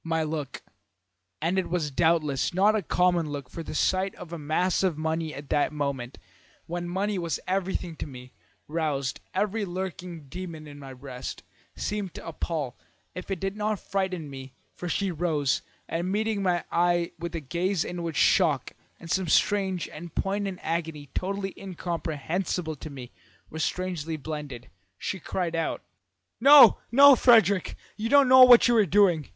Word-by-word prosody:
"My 165 -1 0
look 150 -3 -5 0.8
(and 180 +4 +1
it 190 - -3
was 165 -4 -1
doubtless 155 -2 +1
not 205 +3 +4
a 215 - +1
common 175 -2 +1
look, 140 -3 -6
for 165 - -6
the 160 - -7
sight 190 +4 +1
of 175 -1 -10
a 170 - -5
mass 160 +5 0
of 185 -5 +1
money 160 0 -2
at 140 -1 -9
that 145 - +1
moment, 140 -4 -3 0.5
when 175 +1 -4
money 195 +2 -1
was 170 -2 -2
everything 185 -2 -2
to - - -5
me, 125 -2 -11 0.3
roused 145 -4 -2 0.2
every 210 +1 0
lurking 180 -4 -6
demon 170 0 -7
in 145 -1 -11
my 135 -1 -9
breast) 125 -1 -7 0.3
seemed 205 -4 -4
to - - -9
appall, 155 -5 -4 0.3
if 180 - -8
it 195 -3 -2
did 195 +2 -3
not 210 -1 -1
frighten 185 -7 -3
her, 135 0 -8 0.2
for 175 - -6
she 195 +2 0
rose, 155 -5 0 0.3
and 170 +3 -2
meeting 215 0 0
my 180 -2 +1
eye 175 0 +2
with 170 0 -5
a - - -1
gaze 175 +5 -1
in 175 -1 -5
which 165 -2 -4
shock 155 -8 +3 0.3
and 165 - -8
some 190 -2 0
strange 190 +1 +1
and 165 +1 -10
poignant 195 -1 -2
agony 160 -4 -3
totally 195 +1 -3
incomprehensible 170 -2 -3
to 150 +2 -9
me 130 -4 -9 0.4
were 160 - -6
strangely 165 -2 -2
blended, 145 -5 -7 0.3
she 190 - -4
cried 170 0 -3
out: 165 - -2 0.6
"'No, 275 -2 +9
no, 280 +2 +9
Frederick! 205 -7 +4 0.2
You 225 +1 -2
don't 280 0 +6
know 260 0 +8
what 250 -1 +8
you 240 - +3
are 215 - +5
doing. 175 -5 +3
170 Hz, 170 wpm, -27 LUFS, 155-190 Hz, 0.8 s, No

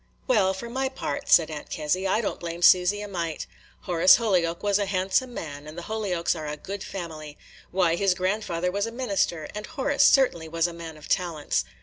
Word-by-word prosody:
"Well, 200 -7 +2
for 235 +5 -7
my 265 +3 -2
part," 280 +1 -5
said 165 -2 +5
Aunt 150 -1 -7
Kezzy, 180 +4 -1
"I 210 +4 +2
don't 210 - -3
blame 170 0 -5
Susy 180 +4 +5
a 210 - -5
mite. 170 -5 -4 0.4
Horace 175 0 +6
Holyoke 180 -7 0
was 205 0 +2
a 200 - -1
handsome 195 +7 0
man, 145 -9 -7
and 155 +2 -10
the 175 - -6
Holyokes 190 -5 -1
are 155 -2 -6
a 150 0 -4
good 195 +6 -6
family. 155 -5 -7 0.3
Why, 175 -2 +2
his 190 0 +2
grandfather 180 -2 -1
was 200 +3 -1
a - - -5
minister, 200 -10 -1
and 210 0 -6
Horace 285 -2 +1
certainly 170 - +3
was 165 0 0
a 175 - -2
man 165 -2 -9
of 150 - -12
talents. 170 -5 0
180 Hz, 205 wpm, -26 LUFS, 165-210 Hz, 0.4 s, Horace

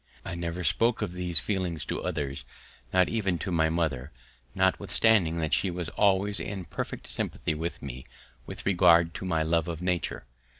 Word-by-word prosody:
I - - -4
never 85 +1 -3
spoke 115 +6 +2
of 85 - -3
these 90 -2 -1
feelings 90 -6 -2
to - - -3
others, 70 -1 -3 0.5
not 90 -1 +4
even 100 -6 0
to 95 - -4
my 80 -2 +3
mother, 75 -5 -1 0.4
notwithstanding 95 -1 +3
that 80 -3 -1
she 95 - +2
was 85 -2 -4
always 100 +1 +2
in 95 -3 -5
perfect - - -5
sympathy - - -2
with 80 +1 -4
me 65 -2 -7 0.4
with - - -7
regard 85 -3 +5
to - - -6
my 80 -3 +1
love 85 +1 +1
of 85 -2 -4
nature. 90 -6 -2
85 Hz, 170 wpm, -28 LUFS, 80-95 Hz, 0.5 s, regard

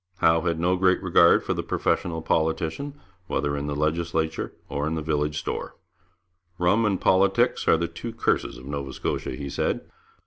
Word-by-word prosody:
Howe 80 -2 +3
had 85 -1 -1
no 90 +2 +2
great 95 0 +3
regard 85 -2 +5
for - - -1
the - - -2
professional 80 -2 -1
politician, 80 - -1 0.3
whether 70 +1 -1
in 70 0 -3
the 75 - -2
legislature 80 +1 -1 0.2
or 70 +1 -2
in 80 - -1
the 80 - -3
village 75 -1 -1
store. 75 - -4 0.8
'Rum 105 +6 +3
and 100 -3 0
politics 95 +1 +3
are - - +6
the 85 +1 -1
two 85 +8 -7
curses 115 - 0
of - - -12
Nova 70 -1 -4
Scotia,' - - -3
he 70 +2 -6
said. - - -2
80 Hz, 175 wpm, -25 LUFS, 75-90 Hz, 0.8 s, are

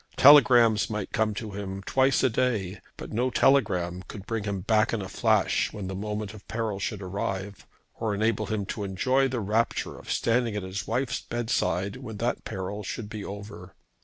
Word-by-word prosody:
Telegrams 120 -6 +7
might 105 -2 -4
come 110 -2 0
to 110 0 -5
him 95 -1 -5
twice 135 +5 +2
a 130 - +5
day, 105 -6 -1 0.2
but - - -8
no 125 +4 +1
telegram 90 -10 +2
could 100 -3 -9
bring 115 -2 -3
him 100 -2 -2
back 110 +4 +2
in 115 - -1
a - - -6
flash - - +1
when 105 -2 -6
the 95 - -4
moment 105 +1 -4
of 105 -2 -13
peril 110 -3 -2
should 100 0 -3
arrive, 95 +1 -4 0.3
or 110 -3 -1
enable 110 0 0
him 105 -2 -2
to 105 +2 -4
enjoy 130 +8 +1
the 130 -2 -2
rapture 110 +3 -1
of - - -7
standing 115 -1 +1
at 105 - -3
his 95 +2 -5
wife's 130 0 -1
bedside 100 -5 -1
when 110 -2 -8
that 120 +3 -1
peril 95 +2 -4
should 105 +2 -5
be 110 -2 -6
over. 100 -2 -9
105 Hz, 190 wpm, -27 LUFS, 100-115 Hz, 0.3 s, Telegrams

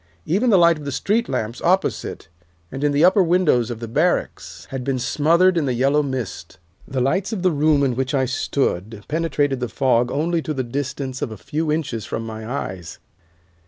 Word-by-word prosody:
Even 205 +9 +1
the 200 - +6
light 170 -2 +5
of 150 - -9
the 140 - -3
street 220 - 0
lamps 110 +3 -3
opposite, 185 - 0 0.4
and 135 - -5
in 145 - +3
the 145 +4 +4
upper 190 +2 +5
windows 170 -9 +2
of 120 -2 -5
the 115 - -6
barracks, 115 - -1
had 135 -2 -4
been 135 0 -1
smothered 170 +7 +3
in 145 - -1
the 125 - 0
yellow 135 +4 +3
mist. 130 -6 -5 0.3
The 130 - -3
lights 185 - 0
of 200 -5 -3
the 185 - +4
room 150 -1 +3
in 130 -3 +1
which 135 +3 -1
I 130 -1 +2
stood 110 -5 -2
penetrated 145 -4 0
the 125 -1 -3
fog 125 -2 +1
only 165 +3 0
to 155 -1 -4
the 130 - -1
distance 135 +1 -4
of - - -1
a 110 - -7
few 150 - -2
inches 145 -8 -2
from 115 - -4
my 110 0 -7
eyes. 95 -10 -5
140 Hz, 200 wpm, -21 LUFS, 125-165 Hz, 0.4 s, the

